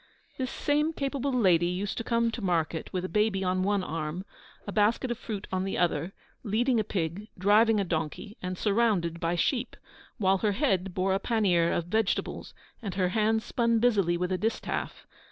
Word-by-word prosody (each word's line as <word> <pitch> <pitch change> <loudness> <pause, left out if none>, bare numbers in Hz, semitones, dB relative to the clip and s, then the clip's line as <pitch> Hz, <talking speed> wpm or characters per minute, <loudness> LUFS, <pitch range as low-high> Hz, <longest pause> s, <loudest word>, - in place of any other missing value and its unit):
This 255 -1 -1
same 300 +3 0
capable 275 -1 -2
lady 185 -9 +3
used 185 +3 -2
to - - -3
come 230 0 +1
to 230 - -5
market 170 -4 -1
with 185 -1 -2
a - - -1
baby 210 -1 +1
on 185 0 +1
one 200 0 +1
arm, 165 +2 -4 0.4
a 205 - -5
basket 220 +5 +2
of 240 - -2
fruit 210 -5 -5
on 185 0 0
the 195 - -2
other, 170 0 0 0.3
leading 235 +3 +1
a - - +2
pig, 185 +1 -3
driving 210 +3 +4
a - - +2
donkey, 170 +5 -3
and 180 0 -4
surrounded 200 -6 +1
by 165 +1 0
sheep, 245 - -1 0.4
while 195 -2 +2
her 210 0 +1
head 195 - 0
bore 190 +1 +1
a 195 - +1
pannier 190 -8 +2
of 170 - -1
vegetables, 220 +3 -1 0.3
and 200 -5 -5
her 185 -2 +1
hands 220 +2 +1
spun 235 -1 +1
busily 205 -7 +2
with 180 +1 -2
a 185 - 0
distaff. 225 +2 -3
200 Hz, 190 wpm, -28 LUFS, 180-225 Hz, 0.4 s, driving